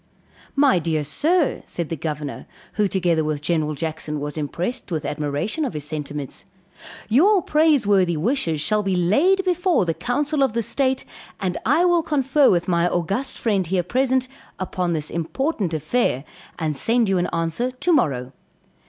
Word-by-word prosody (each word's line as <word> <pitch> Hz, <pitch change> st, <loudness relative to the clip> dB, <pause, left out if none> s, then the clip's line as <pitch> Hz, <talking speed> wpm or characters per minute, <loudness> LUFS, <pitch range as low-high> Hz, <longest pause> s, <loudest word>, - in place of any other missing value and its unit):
"My 275 Hz, -10 st, +4 dB
dear 155 Hz, -2 st, -1 dB
sir," 310 Hz, -, +1 dB
said 170 Hz, -3 st, -5 dB
the 165 Hz, -, -2 dB
Governor, 150 Hz, -2 st, -5 dB, 0.3 s
who 210 Hz, -1 st, +2 dB
together 175 Hz, -4 st, +1 dB
with 155 Hz, -1 st, -2 dB
General 155 Hz, -1 st, -1 dB
Jackson, 155 Hz, 0 st, -4 dB
was 145 Hz, 0 st, -5 dB
impressed 170 Hz, -, -3 dB
with 155 Hz, -3 st, -2 dB
admiration 150 Hz, -, -2 dB
of 260 Hz, -, -3 dB
his 150 Hz, -, -3 dB
sentiments, 150 Hz, -2 st, -5 dB, 0.6 s
"your 360 Hz, -, +4 dB
praiseworthy 205 Hz, -, +3 dB
wishes 170 Hz, -, 0 dB
shall 210 Hz, +5 st, +1 dB
be 195 Hz, -2 st, 0 dB
laid 300 Hz, -, +3 dB
before 360 Hz, -, +2 dB
the 165 Hz, -, 0 dB
council 290 Hz, -, -1 dB
of 265 Hz, -5 st, +2 dB
the 230 Hz, 0 st, 0 dB
state, 265 Hz, +2 st, 0 dB, 0.3 s
and 185 Hz, -2 st, -2 dB
I 315 Hz, +7 st, +4 dB
will 350 Hz, -1 st, +4 dB
confer 280 Hz, -2 st, +3 dB
with 175 Hz, -1 st, +1 dB
my 170 Hz, -1 st, +2 dB
August 195 Hz, +11 st, -2 dB
friend 200 Hz, -6 st, 0 dB
here 180 Hz, +1 st, 0 dB
present, 260 Hz, +5 st, +1 dB, 0.3 s
upon 180 Hz, -2 st, -2 dB
this 155 Hz, -2 st, -2 dB
important 195 Hz, -, -2 dB
affair, 155 Hz, -, 0 dB, 0.3 s
and 155 Hz, -2 st, -2 dB
send 230 Hz, -, +2 dB
you 190 Hz, -2 st, +2 dB
an 175 Hz, -, 0 dB
answer 165 Hz, +9 st, -1 dB
to 255 Hz, +8 st, 0 dB
morrow." 135 Hz, -, +1 dB
185 Hz, 160 wpm, -22 LUFS, 155-265 Hz, 0.6 s, My